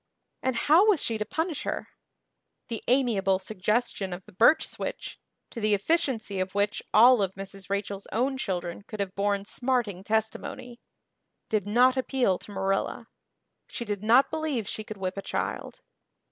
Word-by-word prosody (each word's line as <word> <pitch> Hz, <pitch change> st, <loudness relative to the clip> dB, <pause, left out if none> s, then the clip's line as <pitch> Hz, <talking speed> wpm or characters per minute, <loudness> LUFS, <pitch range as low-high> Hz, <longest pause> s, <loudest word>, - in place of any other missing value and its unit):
And 260 Hz, -1 st, 0 dB
how 320 Hz, -, +5 dB
was 405 Hz, -7 st, +4 dB
she 225 Hz, -4 st, -1 dB
to 210 Hz, -, -1 dB
punish 320 Hz, -, -2 dB
her? -, -, -4 dB, 0.8 s
The 230 Hz, -2 st, -4 dB
amiable 225 Hz, -7 st, +3 dB
suggestion 200 Hz, 0 st, -1 dB
of 180 Hz, +1 st, -8 dB
the 210 Hz, -, -15 dB
birch 235 Hz, -, +4 dB
switch -, -, -6 dB, 0.3 s
to 230 Hz, -, -6 dB
the 210 Hz, -1 st, +3 dB
efficiency 225 Hz, -, 0 dB
of 185 Hz, +1 st, -3 dB
which 205 Hz, 0 st, +1 dB
all 240 Hz, +1 st, +7 dB
of 190 Hz, -1 st, -1 dB
Mrs. 195 Hz, 0 st, -7 dB
Rachel's 200 Hz, 0 st, -3 dB
own 255 Hz, +5 st, +1 dB
children 175 Hz, -6 st, -3 dB
could 215 Hz, +1 st, -9 dB
have 195 Hz, -2 st, -2 dB
borne 200 Hz, 0 st, 0 dB
smarting 235 Hz, -6 st, -1 dB
testimony 220 Hz, +3 st, -3 dB, 0.7 s
did 210 Hz, -2 st, 0 dB
not 250 Hz, +5 st, +4 dB
appeal 255 Hz, -7 st, +1 dB
to -, -, -12 dB
Marilla. 195 Hz, 0 st, -2 dB, 0.6 s
She 235 Hz, -, -5 dB
did 205 Hz, -2 st, -3 dB
not 235 Hz, +5 st, +5 dB
believe 305 Hz, -9 st, -2 dB
she 215 Hz, -, -4 dB
could 215 Hz, 0 st, -8 dB
whip 185 Hz, 0 st, -3 dB
a -, -, -2 dB
child. -, -, -4 dB
215 Hz, 160 wpm, -27 LUFS, 195-250 Hz, 0.8 s, all